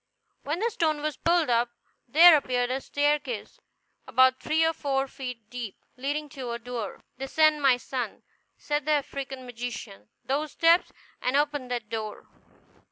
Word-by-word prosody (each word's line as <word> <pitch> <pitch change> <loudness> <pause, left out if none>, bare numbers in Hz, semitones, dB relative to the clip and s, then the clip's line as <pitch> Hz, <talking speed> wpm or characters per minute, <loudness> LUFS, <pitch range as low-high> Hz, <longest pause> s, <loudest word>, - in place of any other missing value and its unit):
When 300 +3 -2
the 460 +5 0
stone 310 -6 0
was 305 -1 -1
pulled 335 -5 +2
up, 235 +1 +2 0.4
there 325 +6 +9
appeared 250 -3 0
a 265 +1 -1
staircase 285 -5 -1 0.5
about 260 +1 +4
three 320 +1 +2
or 325 - +2
four 275 -3 -1
feet 250 -5 -7
deep, 240 -5 -6 0.2
leading 290 +4 -2
to 265 -4 -6
a - - -2
door. 235 -3 -6 0.2
"Descend, 305 +3 +3
my 265 -3 +5
son," 245 -3 -5 0.3
said 295 0 -2
the 305 - +4
African 270 -2 -3
magician, 230 - -7 0.2
"those 290 +3 -1
steps, 335 +2 +4 0.3
and 255 +2 +1
open 290 -3 0
that 240 -3 -3
door. 215 -1 -5
270 Hz, 155 wpm, -27 LUFS, 245-300 Hz, 0.5 s, there